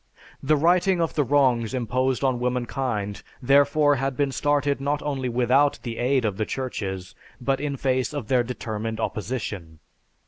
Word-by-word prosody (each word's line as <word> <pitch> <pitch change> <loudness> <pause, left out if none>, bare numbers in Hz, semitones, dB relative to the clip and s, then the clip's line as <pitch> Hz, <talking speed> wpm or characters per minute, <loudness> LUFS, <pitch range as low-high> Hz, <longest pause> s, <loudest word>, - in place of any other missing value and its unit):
The 155 +3 +3
righting 180 +4 +3
of 165 -1 0
the 150 - +2
wrongs 130 -4 +2
imposed 130 +2 0
on 130 -2 +1
womankind 125 -4 -2 0.2
therefore 145 +2 +4
had 135 -1 -2
been 140 -2 +1
started 145 0 0
not 145 +1 0
only 135 -3 -2
without 125 +4 +3
the 115 -2 -5
aid 125 0 +2
of 100 -3 -1
the 110 - 0
churches 95 -8 -4 0.3
but 135 +2 0
in 145 -2 -2
face 130 0 0
of 145 -7 -5
their 125 0 +3
determined 110 -2 -4
opposition. 100 -8 -4
130 Hz, 160 wpm, -24 LUFS, 120-140 Hz, 0.3 s, therefore